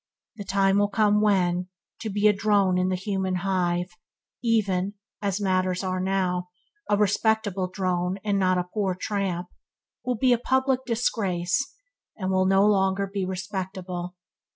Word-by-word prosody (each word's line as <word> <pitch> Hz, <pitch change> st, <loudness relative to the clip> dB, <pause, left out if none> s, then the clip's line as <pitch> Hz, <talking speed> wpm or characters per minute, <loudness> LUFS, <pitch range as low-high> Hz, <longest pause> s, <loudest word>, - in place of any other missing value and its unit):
The 205 Hz, -, -5 dB
time 195 Hz, 0 st, +3 dB
will 205 Hz, -, +3 dB
come 210 Hz, 0 st, +3 dB
when, 180 Hz, -4 st, +2 dB, 0.3 s
to 220 Hz, -, -4 dB
be 205 Hz, +1 st, +2 dB
a 210 Hz, -, +5 dB
drone 200 Hz, -3 st, +2 dB
in 185 Hz, 0 st, +1 dB
the 185 Hz, -, +1 dB
human 190 Hz, 0 st, -2 dB
hive, 180 Hz, -1 st, 0 dB, 0.5 s
even 205 Hz, -4 st, +1 dB, 0.3 s
(as 200 Hz, -1 st, -1 dB
matters 185 Hz, -2 st, 0 dB
are 185 Hz, -1 st, -1 dB
now) 185 Hz, -1 st, -1 dB, 0.4 s
a 205 Hz, -, +3 dB
respectable 205 Hz, -2 st, +1 dB
drone 180 Hz, 0 st, -1 dB
and 205 Hz, -2 st, +1 dB
not 185 Hz, -1 st, +3 dB
a 180 Hz, -, +1 dB
poor 190 Hz, 0 st, -2 dB
tramp, 185 Hz, -4 st, -2 dB, 0.5 s
will 250 Hz, -1 st, -1 dB
be 250 Hz, +2 st, +4 dB
a 235 Hz, -, +1 dB
public 260 Hz, +1 st, +1 dB
disgrace, 220 Hz, 0 st, 0 dB, 0.4 s
and 190 Hz, -2 st, -2 dB
will 185 Hz, 0 st, +2 dB
be -, -, +2 dB
no 195 Hz, +1 st, +5 dB
longer 195 Hz, -1 st, +2 dB
respectable. 185 Hz, -2 st, -4 dB
195 Hz, 155 wpm, -25 LUFS, 185-210 Hz, 0.5 s, a